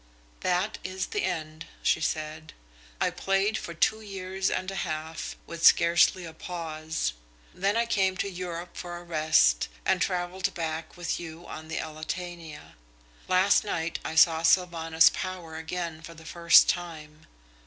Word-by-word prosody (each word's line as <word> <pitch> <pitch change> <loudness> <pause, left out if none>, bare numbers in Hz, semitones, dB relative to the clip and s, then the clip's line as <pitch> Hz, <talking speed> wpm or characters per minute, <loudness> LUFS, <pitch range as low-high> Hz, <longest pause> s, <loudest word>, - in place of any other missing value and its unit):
"That 185 +4 0
is 190 0 -3
the - - -3
end," 160 -3 -4 0.2
she 165 - +2
said. 155 0 -3 0.5
"I - - +1
played 195 +2 +1
for 170 - -5
two 220 +6 +2
years 190 -2 -3
and 185 +1 -2
a 195 - -5
half, 155 +1 -4
with 170 0 -8
scarcely 170 +2 +5
a 165 - -9
pause. 160 - -4 0.4
Then 200 +4 0
I 235 - +2
came 195 -5 +1
to 200 - -1
Europe 180 -2 -6
for 175 -1 -6
a 175 - -10
rest 155 - +3 0.2
and - - +2
travelled 180 0 -1
back 160 0 -4
with 175 -2 -2
you 170 0 -9
on 155 0 -8
the 160 - -4
Elletania. 160 0 -6 0.5
Last 185 +2 +4
night 165 -5 -2
I 160 - -4
saw 160 0 +6
Sylvanus 165 -2 +4
Power 180 -4 -5
again 160 0 -4
for 165 +1 -10
the 160 0 -14
first 170 +1 +6
time. 155 -3 -4
170 Hz, 155 wpm, -28 LUFS, 160-185 Hz, 0.5 s, saw